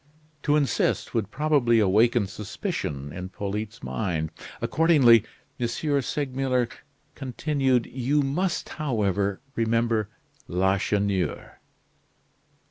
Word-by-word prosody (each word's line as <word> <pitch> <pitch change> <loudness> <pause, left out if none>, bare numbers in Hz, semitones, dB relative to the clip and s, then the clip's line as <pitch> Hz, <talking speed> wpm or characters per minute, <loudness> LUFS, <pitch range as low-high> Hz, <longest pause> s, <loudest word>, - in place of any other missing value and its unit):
To 145 +1 +2
insist 140 -5 +1
would 110 -5 -1
probably 140 -4 +2
awaken 110 +3 +4
suspicion 75 -8 -4
in 90 +1 -6
Polyte's 105 +3 -5
mind; 80 -7 -2 0.3
accordingly, 140 -9 +5 0.4
M. 120 - +1 0.3
Segmuller 130 -2 0 0.5
continued: 135 -2 0
"You 135 +3 0
must, 170 +7 -1
however, 100 -8 -1
remember 115 -2 +1 0.4
Lacheneur?" 95 -1 0
115 Hz, 85 wpm, -26 LUFS, 100-135 Hz, 0.5 s, accordingly